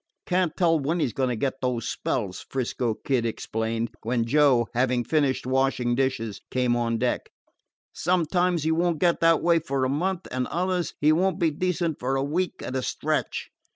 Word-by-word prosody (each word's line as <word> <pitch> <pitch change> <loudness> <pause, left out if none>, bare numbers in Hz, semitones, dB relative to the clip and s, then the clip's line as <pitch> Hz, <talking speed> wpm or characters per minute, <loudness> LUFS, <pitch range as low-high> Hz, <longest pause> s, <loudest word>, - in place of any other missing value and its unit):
"Can't 180 -3 0
tell 165 -3 +3
when 155 +5 -1
he - - +2
's 120 - -4
going 130 -1 0
to 125 - -1
get 135 +3 -2
those 125 -3 -1
spells," 100 -7 -2
'Frisco 125 -3 -1
Kid 130 -1 0
explained, 115 0 -2
when 115 0 0
Joe, 135 -2 +4
having 125 0 +1
finished 140 0 +1
washing 130 -2 +1
dishes, 120 -5 -1
came 125 -2 +1
on 115 -1 0
deck. 125 +2 -1 0.6
"Sometimes 175 -1 +1
he 160 - +1
won't 170 0 +1
get 175 +1 +2
that 165 -1 +4
way 170 -1 +4
for 140 -4 -1
a - - 0
month, 175 +6 -1
and 130 0 -1
others 180 0 -1
he 150 +1 +5
won't 185 +4 +2
be 165 -3 +2
decent 170 0 -1
for 130 +2 -1
a 135 - 0
week 170 +6 -2
at 130 - -4
a 130 - 0
stretch. - - -2
135 Hz, 190 wpm, -25 LUFS, 125-165 Hz, 0.6 s, he